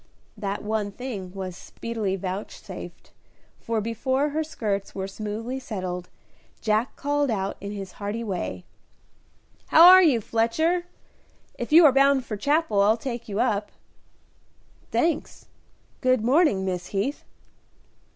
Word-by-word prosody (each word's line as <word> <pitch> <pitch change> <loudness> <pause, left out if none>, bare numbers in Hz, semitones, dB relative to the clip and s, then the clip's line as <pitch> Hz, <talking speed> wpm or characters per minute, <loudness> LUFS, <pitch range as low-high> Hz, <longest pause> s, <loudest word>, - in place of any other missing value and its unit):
That 200 -1 -4
one 210 -1 -1
thing 205 -6 -6
was 185 -2 -6
speedily 220 -1 -4
vouchsafed, 190 +2 -7 0.5
for 225 -1 -2
before 260 +6 0
her 310 +2 -1
skirts 205 -10 -3
were 190 -1 -3
smoothly 215 +6 -5
settled, 185 -7 -5 0.5
Jack 220 +3 0
called 290 0 0
out, 195 -3 -1
in 200 +1 -5
his 195 -2 -6
hearty 205 +5 -4
way, 185 -3 -4 1.0
"How 325 - +7
are 370 +1 +10
you, 295 -10 +4
Fletcher? 315 - 0 0.7
If - - -6
you 325 +2 +8
are 290 - +8
bound 275 -1 +4
for 215 - -4
Chapel 285 -2 +1
I'll 215 +3 +4
take 240 -2 -6
you 205 +1 -2
up." 210 -4 0 1.2
"Thanks; 320 -2 -1 0.6
good 255 -4 +2
morning, 255 - +3
Miss 180 -1 -3
Heath." 210 +9 -2
220 Hz, 130 wpm, -25 LUFS, 200-270 Hz, 1.2 s, are